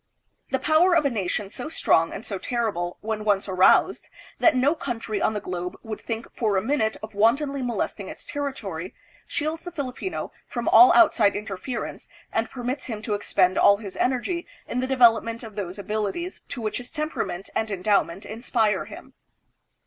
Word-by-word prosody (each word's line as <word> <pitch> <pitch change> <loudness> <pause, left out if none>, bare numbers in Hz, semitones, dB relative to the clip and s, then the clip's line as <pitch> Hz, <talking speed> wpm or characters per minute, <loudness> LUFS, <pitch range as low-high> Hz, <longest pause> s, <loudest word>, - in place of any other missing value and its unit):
The 265 - +1
power 315 +6 +4
of 320 -3 +3
a 280 - +2
nation 205 -1 -2
so 250 - -6
strong 165 - +2
and 205 - -7
so 195 -3 -4
terrible, 205 -8 -2
when 215 0 -3
once 205 -2 +1
aroused, 185 -1 +4 0.3
that 325 -4 +5
no 265 +4 +3
country 230 -8 -4
on 215 - +1
the - - 0
globe 180 -2 -5
would 220 -2 -6
think 230 0 -4
for 215 -4 +1
a - - +2
minute 220 -3 0
of 215 - -7
wantonly 275 +7 +2
molesting 245 -2 -3
its - - -9
territory, 205 - -5 0.3
shields 320 +1 -2
the 355 - -6
Filipino 285 +3 -4 0.2
from - - -4
all 365 0 +8
outside 240 - +5
interference 210 +3 -5 0.3
and 225 0 0
per 250 - -8
mits 255 +3 -2
him 220 -3 -5
to 220 - -2
expend 185 -2 +2
all 200 - +6
his 200 -3 -8
energy 265 +8 -1 0.2
in 250 - -2
the 260 - -1
development 230 -3 +3
of 220 -2 -9
those 195 -2 -5
abilities 215 - -3
to 240 - -5
which 215 - -2
his 245 0 -8
temperament 305 - -4
and 220 - -1
endowment 195 -2 0
inspire 225 -1 0
him. - - -12
225 Hz, 180 wpm, -25 LUFS, 205-270 Hz, 0.3 s, all